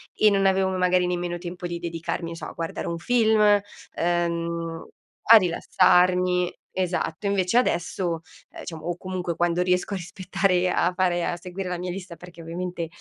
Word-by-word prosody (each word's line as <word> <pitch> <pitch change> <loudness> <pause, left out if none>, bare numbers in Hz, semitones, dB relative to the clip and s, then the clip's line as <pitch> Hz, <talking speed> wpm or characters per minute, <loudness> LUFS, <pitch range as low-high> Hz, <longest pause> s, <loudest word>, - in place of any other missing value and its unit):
e 215 - +5
non 195 -1 +2
avevo, 190 0 +3
magari, 180 0 +3
nemmeno 175 -1 -2
tempo 175 +1 -6
di 170 0 -5
dedicarmi, 170 0 -4
che - - -6
so, - - -7
a - - -8
guardare 165 -1 -4
un 170 0 -2
film, 220 +2 +2 0.5
ehm, 170 -1 -1 0.4
a 230 - +8
rilassarmi. 180 0 +3 0.2
Esatto. 180 -1 -2
Invece 200 +3 +1
adesso, 170 -6 0 0.3
eh - - -13
diciamo, 160 -2 -8
o, 175 -1 -2
comunque, 180 -2 -4
quando 175 0 +1
riesco 180 +2 +1
a - - -1
rispettare 185 +1 0
a 180 +1 +1
fare 175 -2 +1
a 175 - -1
seguire 180 +2 -6
la 180 - -2
mia 180 0 -4
lista, 180 -2 -7
perché, 170 0 -13
ovviamente, 170 0 -4
180 Hz, 170 wpm, -25 LUFS, 170-185 Hz, 0.5 s, a